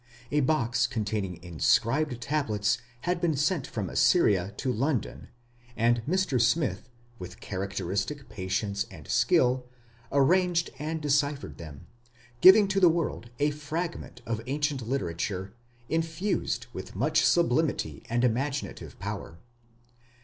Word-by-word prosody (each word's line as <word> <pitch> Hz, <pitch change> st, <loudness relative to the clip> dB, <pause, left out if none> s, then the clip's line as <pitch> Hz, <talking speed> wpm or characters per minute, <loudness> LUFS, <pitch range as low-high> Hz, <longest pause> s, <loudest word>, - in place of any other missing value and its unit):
A 150 Hz, -, +2 dB
box 125 Hz, -4 st, +2 dB
containing 105 Hz, -5 st, -2 dB
inscribed 115 Hz, -, +1 dB
tablets 120 Hz, -6 st, 0 dB, 0.2 s
had 175 Hz, -1 st, -1 dB
been 165 Hz, -4 st, +1 dB
sent 150 Hz, 0 st, 0 dB
from 105 Hz, -4 st, -4 dB
Assyria 100 Hz, -, +3 dB
to 130 Hz, -2 st, -1 dB
London, 135 Hz, +2 st, -2 dB, 0.5 s
and 120 Hz, +1 st, +3 dB
Mr. 185 Hz, -9 st, +1 dB
Smith, 125 Hz, -, +1 dB, 0.3 s
with 90 Hz, -, -9 dB
characteristic 100 Hz, +7 st, -3 dB
patience 100 Hz, +1 st, -2 dB
and 80 Hz, -7 st, -12 dB
skill, 125 Hz, 0 st, +2 dB, 0.4 s
arranged 170 Hz, +4 st, +3 dB
and 155 Hz, +2 st, -3 dB
deciphered 145 Hz, -3 st, 0 dB
them, 80 Hz, -1 st, -10 dB, 0.6 s
giving 200 Hz, +2 st, +9 dB
to 195 Hz, 0 st, +1 dB
the 180 Hz, -3 st, +7 dB
world 160 Hz, -8 st, -2 dB
a 145 Hz, +1 st, +2 dB
fragment 150 Hz, -3 st, -5 dB
of 115 Hz, -1 st, -2 dB
ancient 145 Hz, 0 st, -1 dB
literature 95 Hz, -5 st, -2 dB, 0.3 s
infused 165 Hz, +6 st, -1 dB
with -, -, -8 dB
much -, -, +2 dB
sublimity 155 Hz, -, +1 dB
and 120 Hz, +1 st, +1 dB
imaginative 135 Hz, +4 st, -2 dB
power. 80 Hz, -, -6 dB
130 Hz, 120 wpm, -28 LUFS, 105-155 Hz, 0.6 s, giving